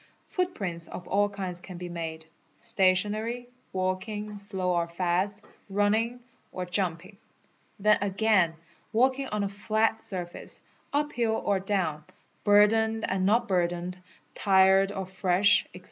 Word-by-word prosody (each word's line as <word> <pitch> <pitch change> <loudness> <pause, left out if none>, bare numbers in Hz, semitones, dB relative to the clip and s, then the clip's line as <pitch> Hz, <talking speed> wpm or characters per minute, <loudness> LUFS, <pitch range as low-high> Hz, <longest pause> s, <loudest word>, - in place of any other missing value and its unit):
Footprints 195 - -2
of 180 - -8
a 205 +3 +2
kinds 185 -3 -5
can 180 -1 -9
be 180 0 -6
made: 165 -2 -5 0.3
stationary, 215 +3 +1 0.2
walking 200 +3 -3
(slow 190 -2 -2
or 170 -1 +1
fast), 185 +4 -1 0.2
running, 220 +5 +1 0.3
or 185 - -4
ju 180 +3 0
np 170 -1 -3
ing. 195 +1 -15 0.6
Then 210 +1 +4
again 200 -4 +2 0.4
walking 260 +4 +2
on 210 -3 -1
a - - 0
flat 220 +2 0
surface, 180 -5 -6 0.3
uphill 245 -6 0
or 200 -1 +2
down, 185 -6 -1 0.4
burdened 220 +2 +4
an 190 0 +1
not 230 +4 +3
burdened, 175 0 -1 0.3
tired 195 0 +4
or 195 -2 -4
fresh, 185 +1 +3
&c. - - -10
195 Hz, 130 wpm, -28 LUFS, 180-215 Hz, 0.6 s, Then